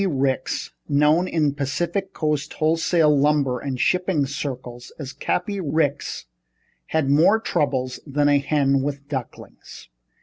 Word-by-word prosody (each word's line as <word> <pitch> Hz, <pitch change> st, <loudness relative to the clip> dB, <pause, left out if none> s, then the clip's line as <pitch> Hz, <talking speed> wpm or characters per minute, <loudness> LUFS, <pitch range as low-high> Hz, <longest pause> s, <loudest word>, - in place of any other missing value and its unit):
Ricks, 135 Hz, -5 st, -1 dB, 0.2 s
known 150 Hz, +5 st, +3 dB
in 150 Hz, -5 st, +1 dB
Pacific 175 Hz, +8 st, -2 dB
Coast 150 Hz, -3 st, -2 dB
wholesale 160 Hz, -1 st, +2 dB
lumber 140 Hz, -3 st, +2 dB
and 130 Hz, -1 st, -4 dB
shipping 180 Hz, -4 st, +1 dB
circles 130 Hz, -3 st, -6 dB
as 140 Hz, -3 st, -7 dB
Cappy 180 Hz, +7 st, -2 dB
Ricks, 145 Hz, -, -1 dB, 0.6 s
had 160 Hz, -3 st, 0 dB
more 160 Hz, +10 st, +4 dB
troubles 130 Hz, -, -1 dB
than 145 Hz, +1 st, +1 dB
a 145 Hz, -1 st, +4 dB
hen 140 Hz, -1 st, +1 dB
with 140 Hz, 0 st, -4 dB
ducklings. 135 Hz, -, -8 dB
145 Hz, 125 wpm, -23 LUFS, 135-160 Hz, 0.6 s, more